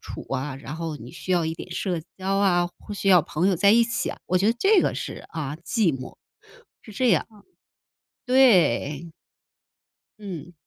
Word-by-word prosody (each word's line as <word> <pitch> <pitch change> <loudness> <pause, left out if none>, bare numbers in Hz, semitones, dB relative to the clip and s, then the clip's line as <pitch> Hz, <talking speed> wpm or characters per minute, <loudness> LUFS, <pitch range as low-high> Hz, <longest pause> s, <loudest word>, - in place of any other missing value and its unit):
处 - - -8
啊， 135 +1 -3
然 140 +2 -8
后 165 -2 -4
你 120 -1 -11
需 185 - -4
要 175 -2 +2
一 160 0 -2
点 180 - -10
社 175 -1 -2 0.2
交 195 +1 -1
啊， 175 -3 +2
或 205 - -8
需 195 - -2
要 180 -2 +7
朋 160 +4 -1
友 190 - +2
在 200 +3 +5
一 235 +1 +6
起 235 - -2
啊， - - -9
我 185 - +2
觉 195 - +1
得 230 - +3
这 395 - +5
个 - - 0
是， - - -6
啊， 150 -2 -4
寂 210 - +1
寞。 130 -1 -8 0.7
是 215 - -12
这 255 +5 +1
样。 - - +3 1.0
对。 180 - +3 1.1
嗯。 180 -5 -8
180 Hz, 195 characters per minute, -24 LUFS, 160-205 Hz, 1.1 s, 要